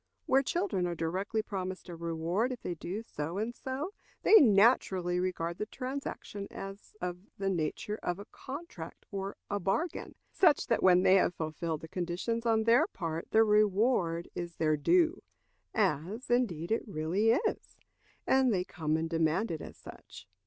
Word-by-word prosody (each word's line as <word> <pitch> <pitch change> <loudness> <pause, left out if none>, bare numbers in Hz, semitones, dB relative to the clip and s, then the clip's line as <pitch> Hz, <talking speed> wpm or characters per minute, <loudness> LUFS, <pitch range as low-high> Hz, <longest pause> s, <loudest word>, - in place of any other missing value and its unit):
Where 265 +1 +4
children 275 - 0
are 175 - -3
directly 190 +7 -1
promised 185 -3 -5
a 175 - -7
reward 170 +8 -1
if 250 - -6
they 180 - -2
do 185 +6 -5
so 165 -4 -5
and 220 +3 -2
so, 270 +10 -4 0.3
they - - +4
naturally 195 -6 +4
regard 170 -2 -2
the 210 - -2
transaction 255 -6 -5
as 195 +2 -9
of 180 0 -3 0.2
the 195 0 0
nature 185 +5 -2
of 175 0 -2
a 200 - -9
contract 265 - -9
or 195 0 -4
a 205 - -1
bargain, 200 - -2 0.2
such 320 -6 +4
that 230 - +1
when 180 -1 +6
they 190 +1 +6
have 180 - +2
fulfilled 160 0 -3
the 160 - -8
conditions 185 +8 -2
on 220 -1 +3
their 230 +2 +5
part 165 -2 -4
the 220 - +5
reward 210 -5 +2
is 170 -1 -5
their 155 -1 +2
due, 340 - +3 0.5
as, 200 - -1
indeed, 195 -10 +1
it 225 - +2
really 180 +5 0
is; 430 - -2 0.5
and 265 -2 +4
they 185 -4 +1
come 155 -3 -1
and 160 0 -1
demand 165 +5 +1
it 160 - -4
as - - -9
such. - - -12
195 Hz, 165 wpm, -31 LUFS, 170-230 Hz, 0.5 s, when